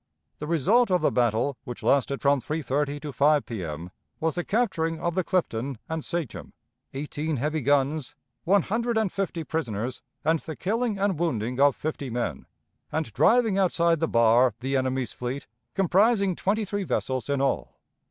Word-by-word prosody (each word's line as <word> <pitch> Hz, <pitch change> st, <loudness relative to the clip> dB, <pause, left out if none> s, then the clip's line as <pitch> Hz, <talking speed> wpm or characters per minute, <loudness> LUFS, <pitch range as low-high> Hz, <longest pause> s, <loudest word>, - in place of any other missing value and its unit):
The 150 Hz, -, -5 dB
result 195 Hz, -, +3 dB
of 180 Hz, -1 st, +2 dB
the -, -, +3 dB
battle, 120 Hz, +3 st, +1 dB
which 120 Hz, -, -8 dB
lasted 140 Hz, 0 st, +2 dB
from 140 Hz, -1 st, +3 dB
3.30 145 Hz, 0 st, -1 dB
to 145 Hz, -2 st, -5 dB
5 145 Hz, +3 st, +3 dB
P.M., 85 Hz, -6 st, -5 dB, 0.3 s
was 160 Hz, 0 st, 0 dB
the 175 Hz, -, -2 dB
capturing 175 Hz, -8 st, 0 dB
of 170 Hz, -, -1 dB
the 185 Hz, +1 st, 0 dB
Clifton 140 Hz, -, -1 dB
and 160 Hz, -1 st, -3 dB
Sachem, 170 Hz, -3 st, -4 dB, 0.4 s
eighteen 150 Hz, +2 st, -3 dB
heavy 150 Hz, +4 st, -1 dB
guns, 140 Hz, +1 st, +1 dB, 0.3 s
one 195 Hz, +1 st, +4 dB
hundred 230 Hz, +2 st, -1 dB
and 215 Hz, -4 st, +1 dB
fifty 190 Hz, -4 st, -2 dB
prisoners, 125 Hz, -7 st, -3 dB, 0.2 s
and 160 Hz, +1 st, +3 dB
the 160 Hz, -, -7 dB
killing 220 Hz, -, -1 dB
and 195 Hz, -4 st, 0 dB
wounding 125 Hz, -7 st, -1 dB
of 140 Hz, -1 st, +5 dB
fifty 150 Hz, -3 st, -4 dB
men, 120 Hz, 0 st, -3 dB, 0.4 s
and 155 Hz, -9 st, -2 dB
driving 225 Hz, -, +4 dB
outside 170 Hz, -3 st, +2 dB
the 165 Hz, -, +1 dB
bar 115 Hz, 0 st, +4 dB
the 135 Hz, +2 st, -1 dB
enemy's 130 Hz, -2 st, 0 dB
fleet, 125 Hz, +3 st, -4 dB, 0.3 s
comprising 195 Hz, +1 st, +3 dB
twenty 210 Hz, +5 st, 0 dB
three 205 Hz, +1 st, -2 dB
vessels 130 Hz, -7 st, -2 dB
in 140 Hz, -1 st, +1 dB
all. 135 Hz, -1 st, -1 dB
155 Hz, 165 wpm, -26 LUFS, 130-185 Hz, 0.4 s, of